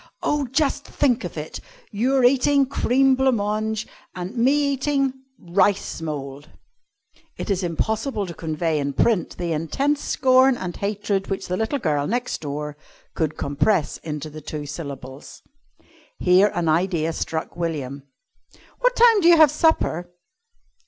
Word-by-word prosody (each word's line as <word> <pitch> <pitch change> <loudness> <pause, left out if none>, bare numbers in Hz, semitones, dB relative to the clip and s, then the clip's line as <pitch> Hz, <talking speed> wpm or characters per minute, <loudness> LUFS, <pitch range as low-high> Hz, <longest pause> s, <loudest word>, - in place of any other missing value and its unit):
"Oh, 295 -2 0
just 275 +3 0
think 255 -3 0
of - - -6
it! - - -6 0.3
Your 255 +5 +1
eating 275 +2 +4
cream 270 0 +2
blanc 265 -1 +2
mange 215 +1 -2 0.3
and 180 +5 -6
me 280 +4 +3
eating 275 -1 0 0.2
rice 185 0 0
mould!" 145 -2 -6 0.9
(It - - -3
is 190 -1 0
impossible 210 - -1
to 175 - -7
convey 160 0 -2
in 140 0 -2
print 210 - +1
the 175 -2 -2
intense 275 - -1
scorn 260 0 +4
and 180 -5 -5
hatred 200 -1 -2
which 195 - -4
the 180 - -1
little 220 +8 -1
girl 150 - 0
next 245 +3 -2
door 150 0 -5 0.4
could 155 -2 -2
compress 145 +4 0
into 150 -1 -6
the 155 +1 -9
two 150 0 -6
syllables.) 140 -3 -8 0.7
Here 185 +3 +5
an 170 -1 -1
idea 165 0 +1
struck 160 0 -4
William. 145 -5 -4 0.8
"What - - +2
time 460 -3 +6
do 335 - +4
you 345 -1 +7
have 310 -3 +7
supper?" 300 - +1
195 Hz, 145 wpm, -23 LUFS, 155-265 Hz, 0.9 s, you